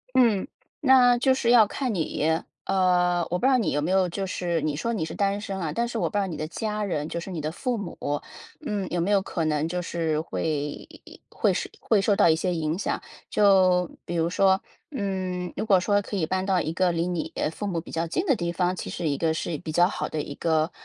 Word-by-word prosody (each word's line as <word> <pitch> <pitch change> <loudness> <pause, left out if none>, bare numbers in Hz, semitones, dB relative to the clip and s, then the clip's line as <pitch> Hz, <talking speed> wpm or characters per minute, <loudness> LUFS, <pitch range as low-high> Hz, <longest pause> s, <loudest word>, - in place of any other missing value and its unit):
嗯， 230 -6 +4 0.3
那 255 -4 +6
就 260 +1 +3
是 235 -3 +1
要 235 -3 +7
看 250 +1 -2
你。 160 -1 0 0.2
呃， 180 -2 +2
我 180 - 0
不 255 - +1
知 - - +5
道 255 - +4
你 225 - 0
有 145 - +1
没 165 - -1
有 190 -1 +3
就 195 +3 -3
是 175 -2 -1
你 150 -2 -1
说 230 +10 -2
你 210 -8 -1
是 - - -6
单 200 0 0
身 195 -2 -5
啊， 160 -3 -2
但 235 +7 0
是 235 -1 -4
我 170 -4 +1
不 - - -5
知 205 - +3
道 195 - 0
你 170 -5 -5
的 155 - -3
家 210 +3 -3
人， 150 -5 -2
就 170 - -4
是 190 - -8
你 170 -4 -4
的 155 +1 -2
父 245 +8 -2
母， 200 -5 -6 0.7
嗯， 205 -8 -2
有 175 - -1
没 180 +5 0
有 200 -1 +4
可 165 -4 -2
能 150 0 0
就 180 +2 -2
是 160 -3 -1
会 150 -2 -3 0.4
会 - - +1
受 - - -2
会 215 -3 +2
受 205 +1 +3
到 200 -3 +5
一 160 - +5
些 180 +2 -1
影 160 0 -1
响。 - - -2 0.3
就 185 -3 +4 0.2
比 175 - -5
如 165 0 +1
说， 190 +1 +3 0.3
嗯， 185 - -3
如 - - -2
果 195 -3 +5
说 205 +2 +2
可 205 - -5
以 165 -5 0
搬 185 +2 -1
到 185 -2 +2
一 160 +1 -2
个 180 0 +2
离 170 +1 0
你 170 -2 -3 0.2
父 205 - -5
母 175 -4 -1
比 165 - -12
较 165 +1 -1
近 350 - -1
的 275 - +4
地 170 -2 -2
方， 180 +1 0
其 - - -5
实 165 -3 -2
一 140 - 0
个 160 +1 +1
是 160 -2 -3
比 160 - -6
较 175 +2 +5
好 - - -3
的 155 - -3
一 140 - -7
个 160 0 +1
180 Hz, 270 characters per minute, -25 LUFS, 165-205 Hz, 0.7 s, 要